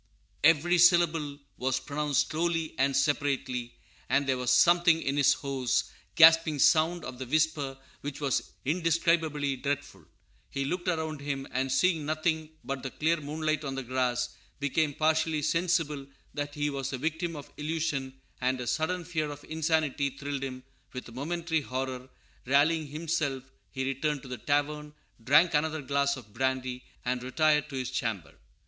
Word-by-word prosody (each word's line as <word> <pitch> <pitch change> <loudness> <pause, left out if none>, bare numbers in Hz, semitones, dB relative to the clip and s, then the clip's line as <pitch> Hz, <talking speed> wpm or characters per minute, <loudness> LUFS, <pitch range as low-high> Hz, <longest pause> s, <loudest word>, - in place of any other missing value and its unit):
"_ - - -42 0.4
Every 165 +3 +5
syllable 165 -4 +4 0.2
was 130 0 0
pronounced 145 0 0
slowly 165 0 -1
and 135 0 +2
separately; 135 -4 0 0.3
and 140 - +2
there 135 -1 +1
was 125 -1 -1
something 175 -1 +5
in 135 - -1
the 145 - +1 0.2
hoarse, 135 -3 -1 0.2
gasping 160 -1 +7
sound 165 +4 +3
of 125 -1 -7
the 130 - -5
whisper 150 -2 0 0.2
which 145 0 -5
was 140 -3 -1
indescribably 160 -3 +1
dreadful. 140 - -4 0.4
He 140 0 -2
looked 175 +5 -3
around 160 -4 -1
him, 140 -1 -3
and 130 +1 -1
seeing 165 +3 +2
nothing 155 +1 -1
but 135 -1 -4
the 135 - -4
clear 160 +5 +1
moonlight 155 +1 -2
on 135 -2 -4
the 135 - -3
grass, 125 -1 0 0.3
became 145 +1 0
partially 155 -1 +1
sensible 160 -4 0 0.3
that 145 0 -4
he 145 0 -1
was 135 -1 -3
the 135 - -3
victim 160 +4 -2
of 145 -1 -10
illusion, 150 -4 -2 0.2
and 130 +1 +1
a 125 - -4
sudden 165 +7 -1
fear 155 -3 -2
of 145 0 -8
insanity 155 -3 0
thrilled 140 0 -5
him 130 -1 -5 0.3
with 125 - -6
a - - -12
momentary 160 +5 -2
horror. 130 -1 -4 0.4
Rallying 150 +4 +3
himself, 145 -4 -2 0.2
he 130 -1 -3
returned 135 +1 -1
to - - -10
the 125 -2 -6
tavern, 150 +3 -1 0.3
drank 150 +8 +5
another 155 0 0
glass 140 +1 +1
of 110 -5 -13
brandy, 130 0 -2 0.2
and 125 0 -1
retired 150 +3 +2
to 140 - -7
his 130 -1 -3
chamber. 100 - -3
145 Hz, 160 wpm, -29 LUFS, 135-160 Hz, 0.4 s, gasping